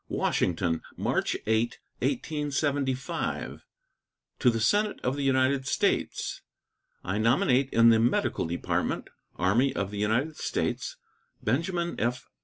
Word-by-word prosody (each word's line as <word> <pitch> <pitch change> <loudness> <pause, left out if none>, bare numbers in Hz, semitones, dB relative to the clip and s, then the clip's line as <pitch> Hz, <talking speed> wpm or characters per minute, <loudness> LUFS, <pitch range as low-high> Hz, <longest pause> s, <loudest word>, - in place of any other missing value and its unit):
WASHINGTON, 85 -2 0 0.2
March - - 0
8, 110 +2 +1 0.2
1875. 145 - -1 0.8
To - - +5
the 115 -1 0
Senate 205 - +2
of 130 +2 0
the 145 - -3
United 135 0 +2
States: - - 0 0.6
I 100 +3 -2
nominate 125 +3 +3
in 115 0 +6
the 115 -1 +5
Medical 115 -6 +1
Department, 85 +1 -2 0.2
Army 115 +10 +2
of 100 0 -2
the 105 - -5
United 120 +9 0
States, - - -2 0.5
Benjamin 170 - -1
F. 125 +2 -1
125 Hz, 115 wpm, -28 LUFS, 110-140 Hz, 0.8 s, in